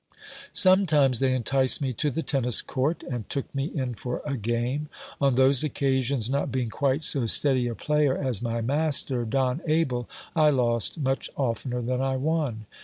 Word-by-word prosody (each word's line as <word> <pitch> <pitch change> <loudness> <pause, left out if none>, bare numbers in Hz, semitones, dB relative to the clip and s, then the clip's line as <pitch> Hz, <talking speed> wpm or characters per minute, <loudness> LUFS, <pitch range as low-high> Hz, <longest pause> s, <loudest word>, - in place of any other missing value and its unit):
Sometimes 155 - +4
they 135 -1 +2
enticed 130 +1 +3
me 135 -3 -2
to 150 +5 +1
the 160 +4 -3
tennis 125 -5 +2
court, 140 +6 -2
and 120 -5 -6
took 140 - -3
me 135 0 -2
in 130 -6 -4
for 125 +2 -5
a 145 -2 -2
game: 120 +6 -2 0.3
on 140 -1 +3
those 130 +1 +3
oc 155 - -3
casions, 130 -3 0
not 140 +3 -2
being 125 -3 -2
quite 140 +3 -1
so 135 -5 +1
steady 130 0 +3
a 120 - -4
player 150 -1 0
as 130 -7 -1
my 115 -1 -2
master, 140 -1 0
Don 130 +5 -1
Abel, 145 -7 0 0.3
I 155 -2 +4
lost 120 -3 +1
much 135 -3 -2
oftener 125 -1 -2
than 125 +2 -2
I 135 0 -1
won. 140 -6 -2
130 Hz, 180 wpm, -25 LUFS, 125-145 Hz, 0.3 s, Sometimes